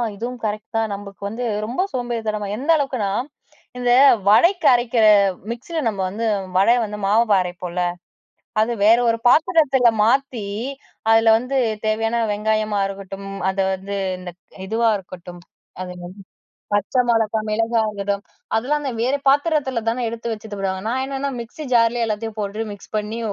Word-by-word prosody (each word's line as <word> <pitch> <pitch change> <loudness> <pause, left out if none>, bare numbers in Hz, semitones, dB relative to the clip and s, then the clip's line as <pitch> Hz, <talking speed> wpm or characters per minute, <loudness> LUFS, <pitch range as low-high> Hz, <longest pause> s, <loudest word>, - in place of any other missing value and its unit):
இதுவும் 240 +4 -5
கரெக்ட் 215 +1 -4
தான் 225 -1 0
நமக்கு 200 0 -11
வந்து 240 +3 -4 0.2
ரொம்ப 245 +11 -2
சோம்பேறித்தனம் 220 -5 -3
எந்த 280 +6 -6
அளவுக்குனா? 255 -8 -1 0.7
இந்த 245 0 -1 0.4
வடைக்கு 340 - +5
அரைக்கிற 240 -1 +2 0.5
மிக்ஸியில 315 +8 -5
நம்ம 200 -3 -2
வந்து 225 +4 -4 0.3
வடைய 230 +6 +5
வந்து 210 -1 -5
மாவு 215 +1 +3
அரைப்போல 180 0 -6 0.8
அது 230 +2 +1
வேற 230 +2 +7
ஒரு 230 - +1
பாத்திரத்தில 275 -3 +4
மாத்தி 245 -2 +1 0.7
அதில 225 0 +6
வந்து 255 +3 -2 0.3
தேவையான 225 +2 0
வெங்காயமா 215 0 0
இருக்கட்டும் 195 0 -8 0.2
அத 190 - -4 0.2
வந்து 195 +2 -5 0.2
இந்த 180 -1 -7 0.4
இதுவா 225 +2 +2
இருக்கட்டும் 180 -2 -11 0.4
அது 185 - -5
என்னது? 180 +2 -10 0.6
பச்ச 205 +4 -1
மோளகா 225 -1 +2
மிளகா 225 +2 +1
இருக்கட்டும். 200 -1 -3 0.3
அதெல்லாம் 275 +7 0
அந்த 270 -3 -3
வேற 255 +4 +1
பாத்திரத்தில 280 -4 +2
தானே 235 +1 0
எடுத்து 230 0 -4
வச்சிட்டு 215 -1 -7
போடுவாங்க. 190 -1 -2
நான் 255 +3 -1
என்னன்னா 275 +1 -3
மிக்ஸி 235 +6 -8
ஜார்லே 230 0 +3
எல்லாத்தையும் 220 0 -4
போட்டு 210 +2 -3
மிக்ஸ் 205 +1 -13
பண்ணி 215 +2 -4
225 Hz, 145 wpm, -21 LUFS, 205-245 Hz, 0.8 s, வேற